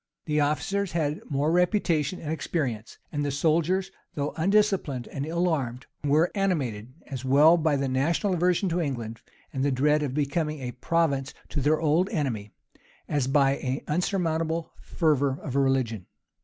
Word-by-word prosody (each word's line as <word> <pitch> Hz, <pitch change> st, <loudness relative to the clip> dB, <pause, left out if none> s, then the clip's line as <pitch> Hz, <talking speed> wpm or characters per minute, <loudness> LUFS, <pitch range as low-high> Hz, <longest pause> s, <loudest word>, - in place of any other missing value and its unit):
The 150 Hz, -1 st, +1 dB
officers 185 Hz, +6 st, 0 dB
had 155 Hz, -2 st, -1 dB
more 145 Hz, +2 st, +1 dB
reputation 180 Hz, -3 st, +1 dB
and 155 Hz, -, -5 dB
experience; 135 Hz, -8 st, -3 dB
and 145 Hz, -2 st, -2 dB
the 145 Hz, -, 0 dB
soldiers, 170 Hz, +6 st, +1 dB, 0.2 s
though 145 Hz, 0 st, -2 dB
undisciplined 190 Hz, -, +1 dB
and 140 Hz, 0 st, -4 dB
ill 170 Hz, +2 st, 0 dB
armed, 130 Hz, -6 st, -2 dB, 0.2 s
were 150 Hz, +4 st, +3 dB
animated, 135 Hz, -, -1 dB
as 130 Hz, -3 st, -6 dB
well 145 Hz, +5 st, +6 dB
by 160 Hz, -3 st, +2 dB
the 140 Hz, 0 st, 0 dB
national 160 Hz, +9 st, +1 dB
aversion 180 Hz, +2 st, +2 dB
to 175 Hz, +1 st, 0 dB
England, 120 Hz, -7 st, -4 dB, 0.3 s
and 135 Hz, -1 st, -1 dB
the 140 Hz, -, +2 dB
dread 150 Hz, +3 st, +2 dB
of 140 Hz, -3 st, -2 dB
becoming 150 Hz, +1 st, -1 dB
a 125 Hz, -2 st, -4 dB
province 140 Hz, 0 st, 0 dB
to 145 Hz, -, -2 dB
their 150 Hz, +3 st, +2 dB
old 165 Hz, +5 st, +2 dB
enemy, 130 Hz, -, -2 dB, 0.6 s
as 145 Hz, -4 st, 0 dB
by 135 Hz, 0 st, +3 dB
an 130 Hz, +2 st, -3 dB
unsurmountable 165 Hz, -1 st, -1 dB
fervor 145 Hz, -5 st, +1 dB
of 140 Hz, -5 st, -6 dB
religion. 130 Hz, -8 st, +1 dB
150 Hz, 155 wpm, -26 LUFS, 135-170 Hz, 0.6 s, well